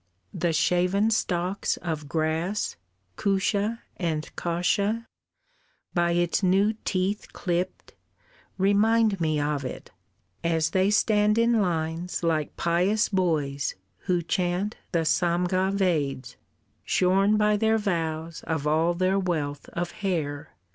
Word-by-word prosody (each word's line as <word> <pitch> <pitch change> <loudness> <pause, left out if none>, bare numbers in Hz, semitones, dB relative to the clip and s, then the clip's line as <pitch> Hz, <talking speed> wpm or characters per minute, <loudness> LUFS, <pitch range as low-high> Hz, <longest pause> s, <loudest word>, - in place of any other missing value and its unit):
The 170 0 0
shaven 180 +6 +2
stalks 185 -2 0
of 155 -4 -4
grass, 160 +6 -1 0.4
Kusha 205 +3 0 0.2
and 160 -4 -3
kasha, 200 +6 0 0.9
by 170 -1 +2
its 175 +2 +1
new 195 +3 +3
teeth 190 +3 -1
clipped, 180 0 -3 0.6
Remind 205 +1 +3
me 155 -2 +1
of 145 -1 -1
it, 130 - -7 0.5
as 165 -1 +1
they 190 +2 +3
stand 210 0 +3
in 230 -1 +3
lines 170 -1 -2
Like 155 -3 0
pious 180 +6 +2
boys 155 -8 0 0.2
who 175 -2 0
chant 180 +3 -1 0.2
the 165 -2 +1
Samga 180 +3 +1
Veds 150 -9 -1 0.5
Shorn 195 +3 +3
by 210 0 +3
their 220 +1 +2
vows 165 -5 -2
of 160 -3 -1
all 160 +3 +2
their 185 +2 +2
wealth 150 -6 -2
of 175 0 -3
hair." 160 -8 -3
180 Hz, 115 wpm, -26 LUFS, 160-200 Hz, 0.9 s, new